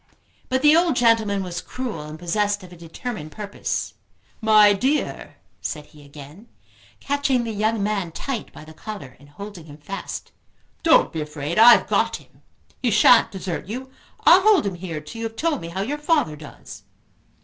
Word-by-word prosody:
But 260 +1 0
the 300 +1 +7
old 335 -3 +3
gentleman 225 -5 +2
was 180 -1 -5
cruel, 250 -9 -5
and 150 +1 -8
possessed 205 +4 -1
of 180 -1 -12
a - - -11
determined 170 0 -7
purpose. 205 +1 -4 0.5
"My 215 -2 +6
dear," 265 +9 -2 0.3
said 150 -1 -5
he 150 -1 -17
again, 145 +9 -13 0.5
catching 280 -3 0
the 230 - -4
young 215 0 0
man 200 -5 -1
tight 245 +6 -5
by 155 - -12
the 160 - -13
collar 165 - -9
and 145 +1 -18
holding 200 +1 -10
him 145 -1 -12
fast. 195 +7 -7 0.5
"Don't 325 -1 +4
be 160 - -3
afraid; 150 +3 -3
I've 235 +1 +8
got - - +1
him; - - -15 0.4
he 250 - +1
shan't 230 +2 +6
desert 185 -3 -5
you; 260 +5 -6 0.3
I'll 360 +3 +7
hold 415 - +4
him 200 - -1
here 170 -3 -6
till 190 +10 -10
you 230 - -3
have 225 - -14
told 305 +2 -1
me 165 - -6
how 180 +3 -4
your 285 +9 -3
father 295 - +1
does." 145 -9 -12
205 Hz, 180 wpm, -22 LUFS, 165-240 Hz, 0.5 s, I've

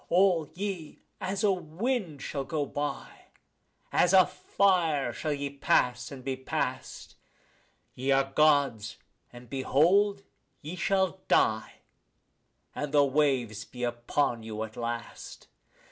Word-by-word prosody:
All 175 -4 +3
ye 185 -5 -5 0.2
as 195 +2 -3
a 205 - +5
wind 180 - -3
shall 140 -2 -3
go 150 +1 -2
by, 145 +1 -5 0.7
as 180 +1 +3
a 185 -2 +8
fire 165 -10 +1
shall 155 +6 -3
ye 140 -1 -3
pass 125 -3 +1
and 135 -2 -9
be 135 0 -2
past; 130 0 -4 0.8
Ye 130 +2 -4
are 135 0 +4
Gods, 140 -8 +2 0.3
and 120 0 -13
behold, 180 - +2 0.4
ye 155 +5 -6
shall 190 0 0
die, 110 0 +2 1.0
and 145 -1 -4
the 145 -1 +5
waves 130 -6 +1
be 125 0 -9
upon 120 +1 -1
you 110 -1 -5
at 110 0 -8
last. 120 0 -6
145 Hz, 125 wpm, -29 LUFS, 125-180 Hz, 1.0 s, a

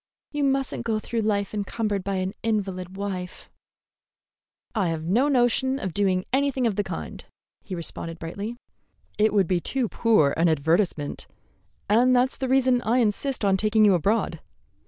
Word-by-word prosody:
You 295 -1 -1
must 270 -1 +1
n't - - -4
go 225 -2 0
through 225 +1 -2
life 205 -2 -1
encumbered 205 -1 -2
by 195 0 -2
an 185 +1 -2
invalid 190 -4 -2
wife." 185 -3 -5 1.2
"I've 165 -7 -1
no 220 - +2
notion 260 0 +2
of 190 -10 -4
doing 185 -1 +1
anything 270 -2 +1
of 220 -4 +1
the 205 - 0
kind," 80 - -6 0.4
he 185 - -6
responded 165 0 -5
brightly. 200 +8 -6 0.6
"It 215 0 +4
would 200 -2 +3
be 180 -1 +1
too 260 +3 -1
poor 215 -12 +3
an 165 +1 +3
advertisement, 160 0 0 0.6
and 245 +5 +4
that's 250 +1 +2
the 265 - -3
reason 260 -2 +3
I 235 +2 +1
insist 240 +1 0
on 195 -1 +3
taking 215 +2 +3
you 200 - +6
abroad. 185 -1 0
210 Hz, 160 wpm, -25 LUFS, 185-240 Hz, 1.2 s, you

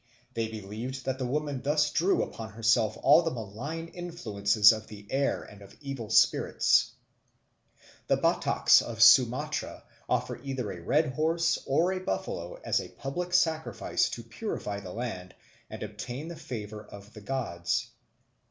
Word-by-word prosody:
They 115 -1 -1
believed 110 +5 -6
that 130 0 -2
the 130 - -1
woman 145 0 -2
thus 150 +1 +1
drew 185 +4 +2
upon 110 -2 -8
herself 115 0 +2
all 145 +5 +7
the 165 - -1
malign 130 +7 -6
influences 110 - +3
of 110 0 -7
the 105 -1 -11
air 140 +1 0
and 105 0 -14
of 100 +2 -15
evil 135 -6 -6
spirits. 110 - +3 1.1
The - - +3
Bataks - - +4
of 115 -1 +1
Sumatra 120 +1 +4 0.3
offer - - -1
either 130 -6 -4
a 90 -2 -8
red 145 - +1
horse 165 +4 +1
or 160 +7 +2
a 185 - -3
buffalo - - -4
as - - +1
a - - -9
public 175 +6 -5
sacrifice 160 -3 +1
to - - -6
purify 100 -1 -5
the 95 -3 -9
land 95 -5 -5 0.3
and - - -7
obtain 120 +8 -6
the 170 - -7
favour 110 -8 -7
of 100 +1 -13
the 105 - -11
gods. 100 -8 -2
125 Hz, 150 wpm, -29 LUFS, 105-150 Hz, 1.1 s, all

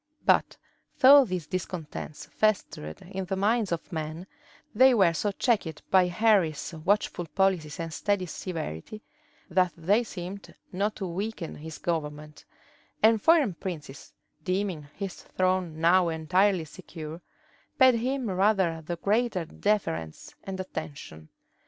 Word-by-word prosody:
But - - +3 0.4
though 275 +1 +8
these 180 -6 -3
discontents 170 -4 -5
festered 195 - -1
in 190 +1 -5
the 190 - -2
minds 210 +1 +1
of 170 -1 -4
men, 160 +2 -4 0.5
they 260 +3 +6
were 185 -6 +4
so 205 +5 -1
checked 200 - -1
by 185 -1 +5
Henry's 180 -5 +2
watchful 175 +1 0
policy 170 -1 0
and 165 -1 -6
steady 200 +2 0
severity, 165 - -6 0.4
that 180 0 +2
they 200 +8 +2
seemed 190 -1 -8 0.2
not 200 +3 -1
to 195 - -4
weaken 190 0 -4
his 160 +1 -8
government; 150 -2 -4 0.6
and 220 -1 +5
foreign 305 - +4
princes, 155 -6 -7 0.3
deeming 185 -5 -2
his 195 -2 -6
throne 185 -3 -1
now 175 +1 +4
entirely 180 +3 +2
secure, 160 0 -9 0.6
paid 260 -2 +7
him 250 +2 -1
rather 190 -4 +2
the 170 +2 -4
greater 205 0 0
deference 155 - -2
and 190 -1 -6
attention. 140 - -7
185 Hz, 125 wpm, -27 LUFS, 160-205 Hz, 0.6 s, though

